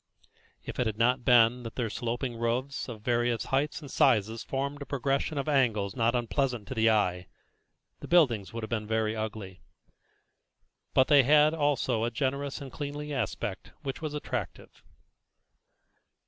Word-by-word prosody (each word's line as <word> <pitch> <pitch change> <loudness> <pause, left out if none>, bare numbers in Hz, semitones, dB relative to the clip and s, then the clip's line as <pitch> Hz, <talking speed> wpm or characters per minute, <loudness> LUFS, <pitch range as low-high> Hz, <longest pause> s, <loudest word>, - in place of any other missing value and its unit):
If - - -7
it 125 - +2
had 110 -1 -3
not 125 +2 +2
been 120 0 +5
that 115 -2 -8
their 115 -4 -2
sloping 120 +2 -3
roofs 120 +4 -2
of 110 -3 -8
various 120 -1 +1
heights 145 +4 -1
and 140 -3 -10
sizes 115 -3 +2
formed 140 +2 -3
a - - -5
progression 140 +2 -1
of 140 - -2
angles 115 -9 +1
not 115 -1 +1
unpleasant 120 -2 -1
to - - -3
the 110 -2 +3
eye, 90 -4 +1 0.7
the - - -9
buildings 120 - +3
would 115 -1 -6
have 110 - -5
been 110 -2 -2
very 110 0 0
ugly; 105 -4 -6 1.3
but 130 - +5
they 145 -2 +7
had 150 +3 +5
also 145 -7 0
a 115 - +1
generous 140 +4 -2
and 135 -2 -8
cleanly 145 0 -5
aspect 110 -4 -4
which 135 0 -5
was 155 -2 -4
attractive. 125 -10 -5
120 Hz, 160 wpm, -29 LUFS, 110-140 Hz, 1.3 s, they